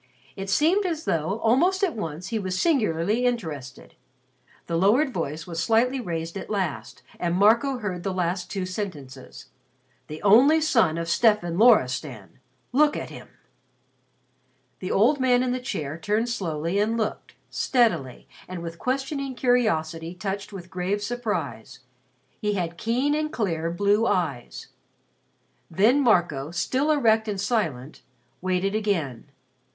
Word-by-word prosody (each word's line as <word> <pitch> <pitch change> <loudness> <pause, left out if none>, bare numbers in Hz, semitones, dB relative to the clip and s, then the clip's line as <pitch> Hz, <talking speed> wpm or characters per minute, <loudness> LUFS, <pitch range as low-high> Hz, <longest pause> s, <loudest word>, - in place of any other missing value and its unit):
It 195 0 -6
seemed 330 - +3
as 330 -3 -3
though 165 +5 0
almost 350 - +2
at 355 -8 +1
once 175 -3 -5
he 225 - -1
was 185 -2 -3
singularly 215 - +1
interested. 160 - -3 0.7
The 170 - -3
lowered 235 - +3
voice 160 -1 -4
was 170 -2 -4
slightly 240 +7 +2
raised 165 -5 -4
at - - -9
last 155 - -3 0.2
and 175 0 0
Marco 230 +7 +3
heard 190 -6 -4
the 195 - -2
last 180 0 -2
two 190 -2 -3
sentences: 150 -10 -7 0.6
"The 155 +1 -7
only 255 +10 +6
son 230 - +2
of 170 0 -3
Stefan 175 -2 +2
Loristan. 130 - +2 0.3
Look 295 +4 +3
at - - -6
him." - - -10 1.5
The 185 - -5
old 240 +8 +3
man 250 -1 +3
in 255 - -1
the 255 - -1
chair 155 - -4
turned 215 +6 0
slowly 170 -4 -2
and 220 +2 +1
looked, 220 -2 -4 0.2
steadily, 170 - 0 0.2
and 180 -2 -6
with 165 0 -7
questioning 270 +1 -2
curiosity 170 -10 0
touched 195 +2 -4
with 185 -2 -10
grave 190 +3 -2
surprise. 215 - -4 0.6
He 210 -1 -1
had 175 -3 -2
keen 245 +9 0
and 305 0 -1
clear 165 -7 -1
blue 205 +6 +2
eyes. 145 -9 -2 1.0
Then 215 - +3
Marco, 175 - +2
still 255 - -1
erect 225 -7 +3
and 205 -2 -3
silent, 165 - -2 0.4
waited 185 +2 0
again. 170 - -2
200 Hz, 140 wpm, -25 LUFS, 165-245 Hz, 1.5 s, only